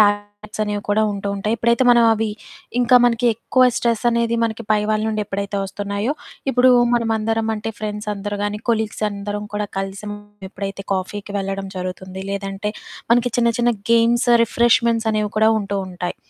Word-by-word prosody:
టార్గెట్సనేవి 205 0 0
కూడా 215 +1 +3
ఉంటూ 200 0 -4
ఉంటాయి, 210 +3 -1
ఎప్పుడైతే 235 +2 +2
మనం 235 -1 +6
అవి 220 0 -1 0.5
ఇంకా 245 +1 +5
మనకి 240 0 +2
ఎక్కువ 255 +3 +1
స్ట్రెస్సనేది 235 0 +1
మనకి 225 0 -3
పై 210 -1 +4
వాళ్ళ 215 0 +1
నుండి 215 -1 -1
ఎప్పుడైతే 200 0 -3
ఒస్తున్నాయో, 200 +5 -2 0.4
ఇప్పుడూ 255 0 +5 0.2
మనమందరమంటే, 225 -1 0
ఫ్రెండ్సందరు 210 -1 -4
గానీ, 205 0 -2
కొలీగ్సందరం 210 -2 -2
కూడా 210 0 -1
కలిసి 195 0 -4 0.5
ఎప్పుడైతే 195 0 -5
కాఫీకి 200 +2 -4
వెళ్ళడం 195 0 -3
జరుగుతుంది, 185 +1 -6
లేదంటే 195 +1 -3 0.4
మనకి 245 +1 +4
చిన్న 235 -1 +4
చిన్న 240 0 +3 0.2
గేమ్స్, 235 +1 +3 0.2
రిఫ్రెష్మెంట్సనేవి 225 -2 +2
కూడా 220 0 +5
ఉంటూ 200 -1 -3
ఉంటాయి. 180 -1 -5
210 Hz, 135 wpm, -20 LUFS, 200-230 Hz, 0.5 s, మనం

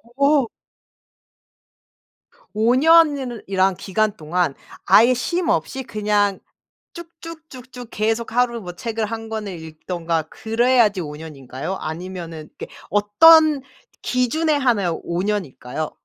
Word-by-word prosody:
어. 280 -1 +3 2.1
5 225 +4 +2
년이라 285 -5 +4
이라는 190 -1 +1
기간 210 +3 -1
동안 165 0 -1 0.3
아예 235 +4 +6
쉼 345 +9 -2
없이 265 +11 -1
그냥 205 -3 0 0.5
쭉 340 -1 -9
쭉 330 -1 -10
쭉 255 -1 -13
쭉 245 -2 -9
계속 225 +2 -1
하루 240 -1 +1
뭐 180 -3 -8
책을 225 +4 -3
1 225 +1 -6
권을 210 -5 -5
읽든가 160 +1 -4
그래야지 225 -3 +1
5 150 -2 -7
년인가요? 150 +1 -7
아니면은 165 -1 -7
이게 - - -8 0.2
어떤 300 +9 +5 0.4
기준에 300 +6 0
한하여 220 - 0
5 170 +1 -2
년일까요? 155 -8 -4
215 Hz, 225 characters per minute, -21 LUFS, 175-255 Hz, 2.1 s, 아예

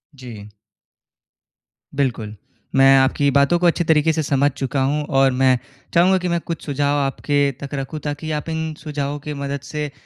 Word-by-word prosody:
जी। 115 -6 -10 1.5
बिल्कुल। 120 -6 -2 0.4
मैं 135 0 +6
आपकी 135 +2 +2
बातों 140 +5 +3
को 180 - 0
अच्छी 170 +1 +2
तरीके 160 -1 +3
से 160 - -1
समझ 140 0 +2
चुका 135 0 -2
हूँ 145 +3 0
और 135 -2 +3
मैं 130 -1 +4 0.4
चाहूँगा 180 +3 +4
कि 180 -1 -3
मैं 170 -1 0
कुछ 165 -1 -6
सुझाव 145 0 0
आपके 140 +1 0
तक 140 - -7
रखूँ, 140 +2 -4
ताकि 150 +2 -5
आप 150 +2 -3
इन 160 0 -3
सुझावों 145 -1 -4
की 150 - -4
मदद 140 0 -4
से 150 0 -4
145 Hz, 175 wpm, -20 LUFS, 135-155 Hz, 1.5 s, मैं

